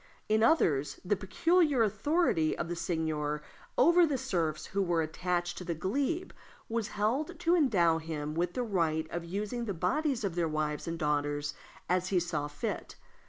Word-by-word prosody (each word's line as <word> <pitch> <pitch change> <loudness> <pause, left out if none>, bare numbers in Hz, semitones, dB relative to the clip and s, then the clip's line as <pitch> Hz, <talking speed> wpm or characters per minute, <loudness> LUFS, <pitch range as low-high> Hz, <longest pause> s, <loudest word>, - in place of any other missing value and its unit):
In 215 +1 +3
others, 150 - +3
the 205 +3 +2
peculiar 285 - +2
authority 215 - +1
of - - -2
the 175 - -2
seigneur 155 -3 -2 0.3
over 345 +1 +6
the 285 -3 0
serfs 160 -9 -1
who 200 - -1
were 170 -3 +1
attached 175 +2 -2
to - - -6
the 170 -2 -3
glebe 280 - -1 0.4
was 225 -2 -1
held 270 - 0
to 350 0 +3
endow 180 - +3
him 155 -2 -4
with 175 +2 -1
the 250 - 0
right 165 -7 0
of 170 0 -3
using 210 +7 -3
the 200 -4 -3
bodies 265 - 0
of 195 -4 -1
their 170 -1 0
wives 155 0 -2
and 165 0 -2
daughters 145 -1 0 0.3
as 180 +1 +1
he 185 -1 +2
saw 165 -4 -2
fit. 145 0 -4
180 Hz, 170 wpm, -31 LUFS, 160-230 Hz, 0.4 s, over